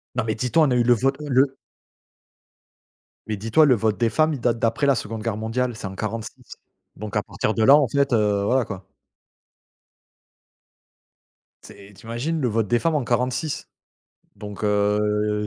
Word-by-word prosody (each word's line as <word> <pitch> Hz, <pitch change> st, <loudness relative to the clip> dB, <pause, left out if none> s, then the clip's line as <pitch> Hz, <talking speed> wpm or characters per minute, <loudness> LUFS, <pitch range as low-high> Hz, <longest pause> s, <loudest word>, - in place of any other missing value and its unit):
Non, -, -, 0 dB
mais 110 Hz, -1 st, -2 dB
dis-toi, 125 Hz, +8 st, +2 dB
on 135 Hz, -, 0 dB
a -, -, +2 dB
eu 120 Hz, -, +3 dB
le 120 Hz, 0 st, +5 dB
vote, 135 Hz, +5 st, 0 dB
heu, -, -, -6 dB
le 135 Hz, +1 st, +2 dB, 1.7 s
Mais 110 Hz, -2 st, -3 dB
dis-toi 115 Hz, +10 st, +3 dB
le 130 Hz, -4 st, +4 dB
vote 110 Hz, -3 st, 0 dB
des 115 Hz, 0 st, +1 dB
femmes, 155 Hz, +4 st, +1 dB
il 140 Hz, -, -5 dB
date 120 Hz, -1 st, 0 dB
d'après 115 Hz, +5 st, 0 dB
la 140 Hz, -, +4 dB
Seconde 110 Hz, -1 st, -5 dB
Guerre 110 Hz, -3 st, -2 dB
mondiale, 120 Hz, +2 st, -2 dB
c'est 100 Hz, -, -6 dB
en 95 Hz, -, -8 dB
46, 110 Hz, +1 st, -6 dB, 0.4 s
donc 105 Hz, 0 st, -8 dB
à 105 Hz, -, 0 dB
partir 110 Hz, -, -2 dB
de 110 Hz, -, +1 dB
là, 135 Hz, +5 st, +8 dB
en 145 Hz, -3 st, +3 dB
fait, 140 Hz, +1 st, 0 dB
heu, 105 Hz, -3 st, +2 dB
voilà 125 Hz, +2 st, +1 dB
quoi. 95 Hz, -3 st, -8 dB, 2.8 s
Tu -, -, -13 dB
sais, 100 Hz, +1 st, -16 dB
tu 100 Hz, +3 st, -17 dB
imagines 130 Hz, +9 st, -3 dB
le 125 Hz, -, +1 dB
vote 110 Hz, -2 st, 0 dB
des 120 Hz, +2 st, +2 dB
femmes 165 Hz, -2 st, 0 dB
en 140 Hz, -, 0 dB
46? 125 Hz, +5 st, -2 dB, 0.7 s
Donc 105 Hz, 0 st, -7 dB
heu, 105 Hz, 0 st, 0 dB
115 Hz, 185 wpm, -23 LUFS, 105-130 Hz, 2.8 s, là